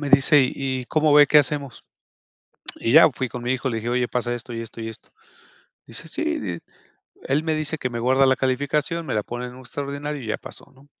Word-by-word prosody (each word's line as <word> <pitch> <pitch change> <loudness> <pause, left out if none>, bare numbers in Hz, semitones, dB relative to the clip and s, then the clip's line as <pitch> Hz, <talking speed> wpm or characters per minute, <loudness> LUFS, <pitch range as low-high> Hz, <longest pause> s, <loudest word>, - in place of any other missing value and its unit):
Me 145 - -3
dice: 140 +1 +6
"Y, 130 -2 -3
¿cómo 155 -1 +2
ve? 145 0 +8
¿Qué 150 - +6
hacemos?". 140 -3 -1 0.9
Y 115 - -1
ya 160 0 +8
fui 130 0 -3
con 125 -1 -6
mi 125 +1 0
hijo, 130 +1 -2
le 115 - -2
dije: 115 - -4
"Oye, 125 0 +1
pasa 120 0 -1
esto, 120 0 -7
y 115 - -4
esto, 115 0 -9
y 115 - -4
esto." 110 - -11 0.8
Dice: - - -6
"Sí. - - -2
Di 85 -5 -4 0.7
él 145 +3 +1
me 160 -1 0
dice 155 0 -2
que 125 - -2
me 120 - -4
guarda 130 +3 +4
la 130 0 +3
calificación, 145 +5 -1
me - - -2
la 105 - +1
pone 120 +3 -5
en 125 - -10
un 130 - -12
extraordinario, 140 +3 -5
y - - -8
ya - - 0
paso, - - -11
¿no?". 135 +2 -20
130 Hz, 235 wpm, -23 LUFS, 120-145 Hz, 0.9 s, ve